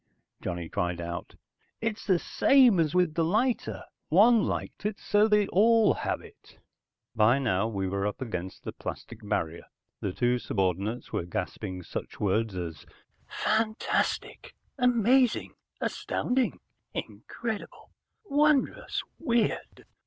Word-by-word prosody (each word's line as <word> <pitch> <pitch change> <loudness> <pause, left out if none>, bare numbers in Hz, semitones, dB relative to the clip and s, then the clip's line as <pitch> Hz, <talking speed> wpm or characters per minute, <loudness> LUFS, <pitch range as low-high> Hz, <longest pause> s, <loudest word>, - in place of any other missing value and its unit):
Johnny 85 -1 -4
cried 85 +1 -2
out. 85 0 -6 0.4
"It's 225 -1 -3
the 185 -3 +4
same 250 +1 +4
as 160 0 +1
with 180 -4 +3
the 165 - +1
lighter. 220 +9 0 0.3
One 215 +6 +6
liked - - -4
it, 210 0 -2
so 210 +1 +3
they 210 -1 +4
all 225 +2 +5
have - - -2
it!" - - -17 0.6
By 110 +4 +5
now 110 -6 +1
we 100 -4 -2
were 100 +2 -1
up 105 - -4
against 95 -7 -5
the - - -4
plastic 120 - -7
barrier. 85 -6 -2 0.3
The 100 - -2
two 120 +5 +1
subordinates 100 +3 -2
were - - -1
gasping 90 +1 -4
such - - -6
words 105 +1 0
as 85 -3 -5 0.4
"Fantastic, 215 0 -1 0.2
amazing, 250 0 +3 0.3
astounding, 250 0 -1 0.4
incredible, 225 -3 -6 0.3
wondrous, 295 -4 +2 0.2
weird". 235 -8 -1
160 Hz, 125 wpm, -28 LUFS, -, 0.6 s, One